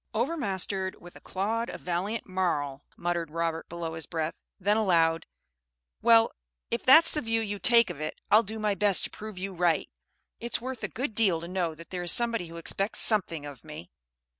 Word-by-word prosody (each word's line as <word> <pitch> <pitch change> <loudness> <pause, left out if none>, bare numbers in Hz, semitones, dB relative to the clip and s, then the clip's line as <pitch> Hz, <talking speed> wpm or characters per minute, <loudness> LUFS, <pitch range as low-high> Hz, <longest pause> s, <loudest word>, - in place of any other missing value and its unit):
"'Overmastered 200 - -2
with 175 0 -14
a - - -14
clod 225 +5 -2
of - - -8
valiant 185 +6 -3
marl,'" 155 -7 -2 0.2
muttered 170 -2 -2
Robert 165 0 -3
below 170 -1 -5
his 160 -1 -7
breath; 160 -1 -4 0.2
then 205 +2 +2
aloud, 165 -6 +2 0.7
"Well, 230 0 +5 0.4
if 235 - -2
that's 315 +6 +7
the 300 - 0
view 225 -2 0
you 205 -2 -4
take 235 +1 +4
of 150 - -9
it, 155 - -5
I'll 215 - +7
do 220 0 -7
my 210 -1 0
best 200 -1 +4
to - - -3
prove 215 -2 -9
you 190 +1 -5
right. 175 -2 0 0.5
It's 235 +1 -2
worth 255 0 -6
a - - 0
good 250 -1 -4
deal 200 -7 +2
to 170 - -7
know 175 -3 -2
that 165 +1 -13
there 180 -1 -4
is 175 -1 +1
somebody 235 -6 +4
who 165 +1 -10
expects 195 +5 -2
something 170 -8 +2
of 145 -2 -10
me." 150 - -10
190 Hz, 195 wpm, -28 LUFS, 165-220 Hz, 0.7 s, that's